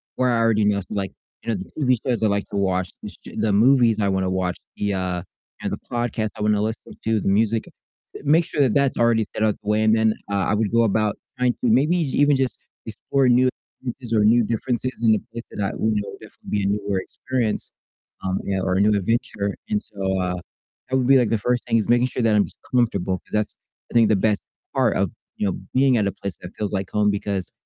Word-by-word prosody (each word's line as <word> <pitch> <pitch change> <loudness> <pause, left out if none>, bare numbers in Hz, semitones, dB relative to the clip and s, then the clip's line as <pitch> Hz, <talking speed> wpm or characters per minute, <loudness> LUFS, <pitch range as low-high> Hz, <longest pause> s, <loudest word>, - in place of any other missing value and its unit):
where 130 0 +2
I 120 - +2
already 115 -2 +3
know, 105 -1 +2
so, - - -11
like, 100 -2 -2 0.3
you - - -5
know, - - 0
the 95 -1 -7
TV 130 -4 +3
shows 120 -3 0
I - - +5
like 100 -1 0
to - - -5
watch, 95 -2 0
the - - -5
sh - - -13 0.2
the 105 -2 +1
movies 115 0 +4
I 100 - +2
wanna 95 -1 0
watch, 90 -1 -1 0.2
the, 100 -1 -1
uh, 90 -2 -1 0.4
you - - -2
know, - - -2
the - - -22
podcast 120 -2 -1
I - - -6
wanna 105 -1 +2
listen 110 +1 -4
to, 110 -1 +2
the - - 0
music, 110 +2 +2
s - - -16
make 160 +4 +5
sure 150 - -4
that 130 -6 +3
that's 140 -1 +2
already 115 -1 +3
set 110 - -4
up 110 -1 +2
the 105 - -4
way, 105 +1 +3
and 110 0 +4
then, 110 -1 +2 0.2
uh, 100 -2 +1
I - - +3
would 105 -1 0
go 115 0 +4
about 110 -1 +1 0.2
trying 125 -1 +2
to, - - -31
maybe 145 +9 +3
j 135 - -2
even 145 0 +5
just 130 -1 -1 0.3
explore 130 +4 0
new 125 +1 +5
experiences 125 -1 -8
or 105 -2 +4
new 115 +2 +5
differences 120 +2 -2
in 110 -1 +6
a - - -1
place 115 - -6
that 105 - -3
I - - -1
would 110 0 +1
know 105 -1 -2
would - - -11
definitely - - -13
be 100 -1 +1
a - - +1
newer 100 -1 0
experience, 120 +2 -3 0.5
um, 95 0 -1
yeah, 95 -1 0
or 95 0 0
a 95 - +3
new 105 +1 +4
adventure, 100 -1 -1
and 105 - +1
so, 95 -2 -2
uh, 90 0 -1 0.5
that 130 - +2
would 125 -2 +1
be, 135 0 +7
like, 125 -3 +3
the 115 - +2
1st 125 +3 0
thing, 115 -1 +2
is 110 - -1
making 120 +1 +4
sure 130 - -3
that 110 -2 +3
I'm 105 - +5
just - - -11 0.2
comfortable 100 -6 +1
'cause - - -18
that's, 105 -1 0 0.4
I - - -10
think, 115 -2 +6
the 110 - +4
best 105 +1 +1 0.3
part - - +2
of, - - +1 0.3
you 105 - 0
know, 95 - -2
being 130 -1 +4
at 105 - +2
a - - 0
place 100 -5 -6
that 85 - -8
feels 105 -2 -2
like 95 -1 -2
home 105 -1 +2
because 100 -3 -3
110 Hz, 255 wpm, -23 LUFS, 100-120 Hz, 0.5 s, be